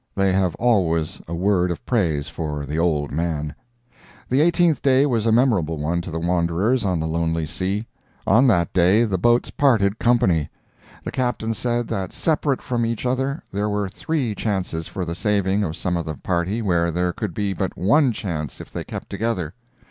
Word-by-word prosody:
[They 95 Hz, -1 st, +2 dB
have 95 Hz, -2 st, +1 dB
always 85 Hz, -10 st, +1 dB
a 85 Hz, -, -4 dB
word 90 Hz, 0 st, +2 dB
of 85 Hz, -, -5 dB
praise 80 Hz, -, 0 dB
for 75 Hz, -2 st, -4 dB
the 75 Hz, +3 st, -3 dB
"old 75 Hz, -4 st, +1 dB
man"] 75 Hz, -1 st, -2 dB, 0.8 s
The 130 Hz, +3 st, +3 dB
eighteenth 170 Hz, -1 st, +3 dB
day 135 Hz, 0 st, +4 dB
was 115 Hz, -5 st, 0 dB
a -, -, +4 dB
memorable 110 Hz, -, +2 dB
one 80 Hz, +4 st, -1 dB
to 90 Hz, -, -7 dB
the 80 Hz, -, -4 dB
wanderers 90 Hz, +8 st, +1 dB
on 90 Hz, -4 st, 0 dB
the 80 Hz, -, -2 dB
lonely 80 Hz, 0 st, -1 dB
sea. 95 Hz, +7 st, -2 dB, 0.4 s
On 125 Hz, +4 st, +5 dB
that 85 Hz, -8 st, +2 dB
day 95 Hz, +5 st, +4 dB
the 95 Hz, -5 st, -1 dB
boats 120 Hz, +5 st, +2 dB
parted 110 Hz, -7 st, +2 dB
company. 95 Hz, -11 st, +2 dB, 0.5 s
The -, -, -4 dB
Captain 120 Hz, -3 st, -1 dB
said 120 Hz, 0 st, -1 dB
that 95 Hz, -2 st, -3 dB
separate 150 Hz, -4 st, 0 dB
from 120 Hz, -2 st, -1 dB
each 115 Hz, +1 st, -2 dB
other 135 Hz, +4 st, -1 dB
there 105 Hz, +2 st, -1 dB
were 105 Hz, -1 st, -1 dB
three 130 Hz, +3 st, -2 dB
chances 95 Hz, -6 st, -2 dB
for 95 Hz, -, -4 dB
the 85 Hz, -, -3 dB
saving 100 Hz, +2 st, +1 dB
of 80 Hz, -4 st, -3 dB
some 90 Hz, -1 st, -1 dB
of 85 Hz, -2 st, -3 dB
the 80 Hz, -, -3 dB
party 90 Hz, -, -1 dB
where 85 Hz, -4 st, +2 dB
there 90 Hz, +1 st, 0 dB
could 100 Hz, -5 st, -4 dB
be 100 Hz, -2 st, -1 dB
but 95 Hz, 0 st, -3 dB
one 130 Hz, -, +4 dB
chance 85 Hz, -9 st, -4 dB
if -, -, -10 dB
they -, -, -4 dB
kept -, -, -7 dB
together. 100 Hz, -8 st, -2 dB
95 Hz, 190 wpm, -22 LUFS, 85-115 Hz, 0.8 s, On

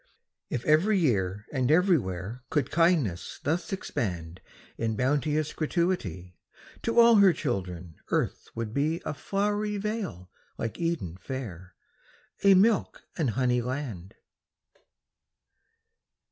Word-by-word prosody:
If 125 Hz, -, -3 dB
every 175 Hz, +8 st, +4 dB
year 105 Hz, -, 0 dB
and 130 Hz, -2 st, +1 dB
everywhere 125 Hz, -, +1 dB
Could 145 Hz, -4 st, 0 dB
kindness 160 Hz, -, +1 dB
thus 160 Hz, +5 st, -1 dB
expand 90 Hz, -, -4 dB, 0.3 s
In 115 Hz, -1 st, -1 dB
bounteous 145 Hz, +4 st, 0 dB
gratuity, 135 Hz, -, -2 dB, 0.4 s
To 230 Hz, +1 st, +2 dB
all 235 Hz, -1 st, +8 dB
her 200 Hz, -2 st, +7 dB
children 90 Hz, -, -4 dB
earth -, -, -1 dB
would 115 Hz, -2 st, -4 dB
be 155 Hz, +5 st, 0 dB
A -, -, -2 dB
flowery 205 Hz, +5 st, -1 dB
vale 195 Hz, -, -4 dB, 0.3 s
like 115 Hz, -, -4 dB
Eden 165 Hz, -, -2 dB
fair, 95 Hz, -8 st, -7 dB, 0.7 s
A 200 Hz, -1 st, +7 dB
milk 210 Hz, +3 st, +2 dB
and 155 Hz, -7 st, 0 dB
honey 125 Hz, +1 st, +1 dB
land. 120 Hz, -8 st, -5 dB
135 Hz, 110 wpm, -28 LUFS, -, 0.7 s, all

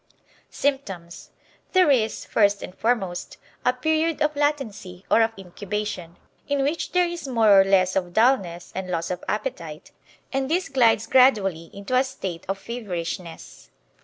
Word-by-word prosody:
Symptoms 195 Hz, -12 st, -3 dB, 0.4 s
There 370 Hz, -6 st, +5 dB
is, 220 Hz, -5 st, +1 dB
first 205 Hz, -2 st, +2 dB
and -, -, -8 dB
foremost, 195 Hz, -7 st, -2 dB, 0.3 s
a 250 Hz, -, +4 dB
period 315 Hz, +5 st, 0 dB
of 300 Hz, 0 st, +1 dB
latency 240 Hz, -11 st, -2 dB
or -, -, +6 dB
of 225 Hz, 0 st, +2 dB
incubation, 195 Hz, -2 st, -5 dB, 0.3 s
in 285 Hz, -1 st, 0 dB
which 295 Hz, +5 st, -2 dB
there 360 Hz, -1 st, +3 dB
is 345 Hz, -4 st, -6 dB
more 220 Hz, -6 st, +5 dB
or -, -, +5 dB
less 190 Hz, -1 st, +2 dB
of 180 Hz, -2 st, -1 dB
dullness 195 Hz, -6 st, +1 dB
and 190 Hz, 0 st, -5 dB
loss 165 Hz, -1 st, -2 dB
of 180 Hz, -, -5 dB
appetite, 170 Hz, -, -4 dB, 0.4 s
and 270 Hz, 0 st, -1 dB
this 355 Hz, +1 st, 0 dB
glides 230 Hz, -5 st, +3 dB
gradually 205 Hz, -11 st, +3 dB
into 200 Hz, +6 st, -4 dB
a 255 Hz, -, +5 dB
state 190 Hz, -10 st, -6 dB
of 195 Hz, -, -1 dB
feverishness. 180 Hz, -6 st, -6 dB
215 Hz, 150 wpm, -24 LUFS, 185-270 Hz, 0.4 s, or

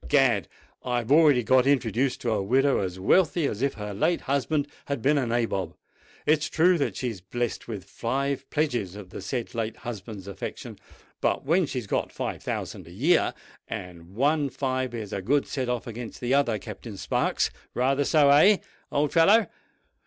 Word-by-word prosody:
Egad! 130 Hz, -, +3 dB, 0.4 s
I've 120 Hz, -1 st, -2 dB
already 145 Hz, -5 st, +6 dB
got 130 Hz, +3 st, +4 dB
introduced 130 Hz, -1 st, +1 dB
to 120 Hz, -, -1 dB
a 110 Hz, -, +1 dB
widow 135 Hz, +7 st, +2 dB
as 95 Hz, -1 st, -3 dB
wealthy 170 Hz, -, +3 dB
as 110 Hz, -4 st, -2 dB
if 140 Hz, 0 st, 0 dB
her 105 Hz, -1 st, -5 dB
late 165 Hz, -, +1 dB
husband 140 Hz, +2 st, 0 dB, 0.2 s
had 140 Hz, -2 st, -2 dB
been 145 Hz, +5 st, +3 dB
a 130 Hz, -, -1 dB
Nabob. 115 Hz, -7 st, -1 dB, 0.5 s
It's 155 Hz, 0 st, +2 dB
true 175 Hz, +1 st, +3 dB
that 140 Hz, -, -1 dB
she's 115 Hz, -7 st, -4 dB
blest 120 Hz, +5 st, -3 dB
with 105 Hz, -5 st, -5 dB
five 135 Hz, +3 st, -3 dB
pledges 120 Hz, -, -1 dB
of 100 Hz, -3 st, -10 dB
the -, -, -7 dB
said 115 Hz, +5 st, -4 dB
late 115 Hz, -1 st, -2 dB
husband's 105 Hz, -4 st, -6 dB
affection; 100 Hz, -, -7 dB, 0.4 s
but -, -, 0 dB
then 165 Hz, +3 st, +3 dB
she's 125 Hz, -5 st, -4 dB
got -, -, -1 dB
five -, -, -4 dB
thousand -, -, -5 dB
a -, -, -12 dB
year—and 90 Hz, -, -2 dB
one 145 Hz, +3 st, +2 dB
five 130 Hz, -2 st, -2 dB
is 110 Hz, -4 st, -6 dB
a 100 Hz, -, -2 dB
good 140 Hz, +8 st, +2 dB
set 130 Hz, -4 st, -3 dB
off 125 Hz, -2 st, -2 dB
against 115 Hz, 0 st, -7 dB
the 125 Hz, +1 st, -1 dB
other, 140 Hz, -6 st, +2 dB
Captain 105 Hz, +1 st, -9 dB
Sparks. -, -, 0 dB, 0.2 s
Rather 135 Hz, +3 st, +2 dB
so—eh? 150 Hz, +7 st, +6 dB, 0.3 s
old 145 Hz, +1 st, +1 dB
fellow?" 200 Hz, +7 st, +6 dB
125 Hz, 170 wpm, -26 LUFS, 110-145 Hz, 0.5 s, already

